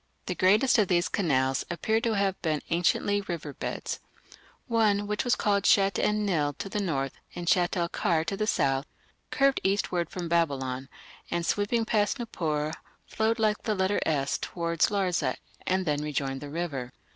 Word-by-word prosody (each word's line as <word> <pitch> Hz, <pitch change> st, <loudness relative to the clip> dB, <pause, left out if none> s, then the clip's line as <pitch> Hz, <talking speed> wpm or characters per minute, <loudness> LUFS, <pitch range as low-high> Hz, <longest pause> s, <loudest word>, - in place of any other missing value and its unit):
The 180 Hz, -, -2 dB
greatest 210 Hz, +8 st, +4 dB
of 205 Hz, -, +3 dB
these 175 Hz, -1 st, +2 dB
canals 135 Hz, -7 st, +1 dB
appear 220 Hz, +6 st, 0 dB
to 230 Hz, -2 st, +1 dB
have 195 Hz, -2 st, 0 dB
been 155 Hz, -3 st, -1 dB
anciently 180 Hz, +4 st, +2 dB
river 170 Hz, -6 st, -5 dB
beds. -, -, -4 dB, 0.7 s
One, 215 Hz, -4 st, +2 dB
which 210 Hz, +4 st, -2 dB
is 245 Hz, -, +4 dB
called 200 Hz, -1 st, +1 dB
Shatt 195 Hz, -2 st, +4 dB
en 210 Hz, 0 st, +1 dB
Nil 150 Hz, -7 st, +1 dB
to 195 Hz, -, -6 dB
the 210 Hz, -, -2 dB
north, 140 Hz, -9 st, -1 dB, 0.2 s
and 175 Hz, -1 st, -5 dB
Shatt 175 Hz, +1 st, +3 dB
el 170 Hz, -1 st, +1 dB
Kar 165 Hz, -1 st, 0 dB
to 185 Hz, -, -2 dB
the 215 Hz, +2 st, -1 dB
south, 135 Hz, -7 st, +1 dB, 0.4 s
curved 275 Hz, 0 st, +2 dB
eastward 190 Hz, -3 st, 0 dB
from 175 Hz, -2 st, -5 dB
Babylon, 135 Hz, -6 st, 0 dB, 0.4 s
and 170 Hz, -1 st, -1 dB
sweeping 215 Hz, +5 st, +1 dB
past 210 Hz, +2 st, +1 dB
Nippur, 155 Hz, -, -2 dB, 0.3 s
flowed 220 Hz, +1 st, 0 dB
like 215 Hz, -2 st, +1 dB
the 215 Hz, -2 st, -1 dB
letter 190 Hz, +1 st, +1 dB
S 140 Hz, -3 st, 0 dB
towards 170 Hz, -2 st, 0 dB
Larsa 180 Hz, -10 st, 0 dB, 0.3 s
and 185 Hz, 0 st, +1 dB
then 150 Hz, -2 st, 0 dB
rejoined 140 Hz, -3 st, -2 dB
the 145 Hz, -, -7 dB
river. 145 Hz, -6 st, -4 dB
180 Hz, 170 wpm, -28 LUFS, 150-205 Hz, 0.7 s, greatest